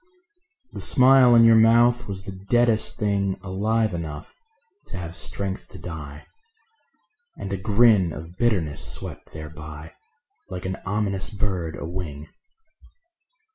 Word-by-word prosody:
The -, -, -5 dB
smile 130 Hz, -2 st, +6 dB
on 115 Hz, -, +7 dB
your 115 Hz, 0 st, +7 dB
mouth 120 Hz, +2 st, +4 dB
was 95 Hz, -1 st, -5 dB
the 100 Hz, -, -6 dB
deadest 110 Hz, +4 st, +1 dB
thing 100 Hz, -2 st, -1 dB
Alive 105 Hz, +3 st, 0 dB
enough 80 Hz, -4 st, -6 dB, 0.5 s
to 95 Hz, -, -7 dB
have 85 Hz, -1 st, -6 dB
strength 95 Hz, 0 st, -4 dB
to -, -, -12 dB
die; 75 Hz, -4 st, -8 dB, 1.1 s
And 100 Hz, -, -5 dB
a -, -, -1 dB
grin 105 Hz, -2 st, +3 dB
of 80 Hz, +3 st, -9 dB
bitterness 90 Hz, -9 st, 0 dB
swept -, -, -5 dB
thereby 75 Hz, 0 st, -9 dB, 0.6 s
Like 90 Hz, -1 st, -6 dB
an 95 Hz, 0 st, -3 dB
ominous 100 Hz, -1 st, -1 dB
bird 95 Hz, -6 st, -3 dB
a -, -, -6 dB
wing. 80 Hz, -4 st, -6 dB
95 Hz, 130 wpm, -24 LUFS, 85-110 Hz, 1.1 s, on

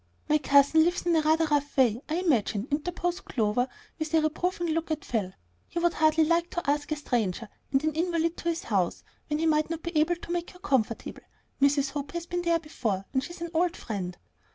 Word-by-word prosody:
"My 305 Hz, 0 st, +3 dB
cousin 285 Hz, +2 st, +5 dB
lives 350 Hz, +2 st, 0 dB
in 345 Hz, -1 st, +3 dB
a 320 Hz, -, +4 dB
rather 315 Hz, +1 st, +3 dB
rough 290 Hz, -1 st, 0 dB
way, 240 Hz, -3 st, +4 dB
I 310 Hz, -, 0 dB
imagine," 245 Hz, -, +1 dB
interposed 350 Hz, +4 st, -2 dB
Clover, 230 Hz, +2 st, 0 dB, 0.3 s
with 315 Hz, -1 st, -3 dB
a 320 Hz, -, +5 dB
reproving 345 Hz, +3 st, -1 dB
look 330 Hz, +1 st, -1 dB
at 310 Hz, -2 st, -2 dB
Phil. 205 Hz, -6 st, -1 dB, 0.4 s
"He -, -, -8 dB
would 345 Hz, 0 st, +2 dB
hardly 315 Hz, 0 st, +4 dB
like 335 Hz, +2 st, +2 dB
to 345 Hz, -, -4 dB
ask 290 Hz, +1 st, 0 dB
a -, -, +2 dB
stranger 230 Hz, -7 st, -1 dB, 0.2 s
and 270 Hz, +1 st, +2 dB
an 310 Hz, 0 st, +1 dB
invalid 335 Hz, 0 st, 0 dB
to 340 Hz, -, -2 dB
his 335 Hz, 0 st, -2 dB
house, 190 Hz, -6 st, 0 dB, 0.2 s
when 300 Hz, -, 0 dB
he 325 Hz, -, 0 dB
might 310 Hz, -1 st, +2 dB
not 330 Hz, -1 st, -4 dB
be 340 Hz, 0 st, -5 dB
able 310 Hz, +3 st, +3 dB
to 345 Hz, -, -9 dB
make 345 Hz, 0 st, -2 dB
her 360 Hz, -, -15 dB
comfortable. 260 Hz, -, -1 dB, 0.4 s
Mrs. 280 Hz, 0 st, +3 dB
Hope 285 Hz, +1 st, -5 dB
has 340 Hz, 0 st, -3 dB
been 350 Hz, 0 st, -2 dB
there 340 Hz, -1 st, +2 dB
before, 225 Hz, -, -3 dB
and 265 Hz, -1 st, +1 dB
she's 345 Hz, +3 st, -9 dB
an 340 Hz, -1 st, -4 dB
old 345 Hz, +1 st, +1 dB
friend." 185 Hz, -5 st, -5 dB
310 Hz, 220 wpm, -28 LUFS, 275-340 Hz, 0.4 s, cousin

